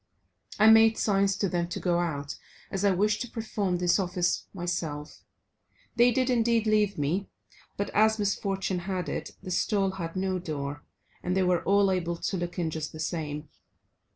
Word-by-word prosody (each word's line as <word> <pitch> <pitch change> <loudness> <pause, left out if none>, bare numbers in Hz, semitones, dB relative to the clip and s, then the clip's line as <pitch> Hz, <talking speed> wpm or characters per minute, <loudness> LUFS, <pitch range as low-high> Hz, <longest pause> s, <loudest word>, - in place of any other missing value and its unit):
I 215 - +5
made 225 0 +7
signs 195 -1 +2
to 200 - 0
them 175 -2 -1
to 175 - -5
go 175 -1 +1
out, 145 -5 -3 0.4
as 195 0 -2
I 200 - +5
wished 205 +3 +1
to 245 - -4
perform 210 -5 -2
this 175 +2 +2
office 180 -1 0
myself; 165 -5 -4 0.7
they 240 +1 +6
did 255 +1 +1
indeed 235 -2 +2
leave 210 -2 +2
me, 160 +7 -1 0.5
but 200 - -2
as 220 +1 +4
misfortune 195 -2 -1
had 180 0 -3
it, - - -5
the 185 - -6
stall 195 +1 +1
had 170 -3 -6
no 185 0 -1
door, 145 -4 -5 0.4
and 180 +1 -1
they 190 - +3
were 180 -1 +2
all 200 0 +4
able 170 -2 -1
to 195 - -2
look 175 0 -4
in 165 -3 -1
just 155 0 -4
the 155 - -9
same. 155 -2 -3
185 Hz, 180 wpm, -28 LUFS, 170-205 Hz, 0.7 s, made